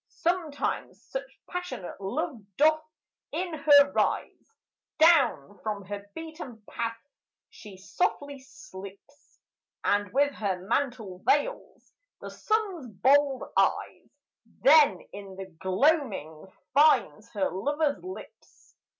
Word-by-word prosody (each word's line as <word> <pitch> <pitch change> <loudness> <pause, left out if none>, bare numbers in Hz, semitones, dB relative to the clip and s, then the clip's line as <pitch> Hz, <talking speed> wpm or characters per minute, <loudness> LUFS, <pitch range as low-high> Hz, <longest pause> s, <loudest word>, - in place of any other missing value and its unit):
Sometimes 335 -4 -2
such - - -5 0.2
passionate 360 - -6
love 275 - -3 0.2
doth 310 +1 +4 0.5
in 355 -1 -3
her 285 -2 +6
rise, - - -1 0.5
Down 290 - +4
from 205 -3 -4
her 205 +1 -7
beaten 315 -9 -9
path 230 -1 -3 0.5
she 205 -3 -12
softly 285 - -2
slips, 265 -2 -14 0.4
And 205 -1 +1
with 285 +4 +2
her 200 -6 -2
mantle 230 -7 -2
veils 400 - -1 0.3
the - - -8
Sun's 405 - -2
bold 270 +6 +3
eyes, - - 0 0.5
Then 285 - +6
in 200 -1 -9
the 195 0 -7
gloaming 190 - 0 0.3
finds 270 -6 +3
her 195 -3 0
lover's 290 - -1
lips. 370 +1 -12
275 Hz, 105 wpm, -28 LUFS, 200-310 Hz, 0.5 s, her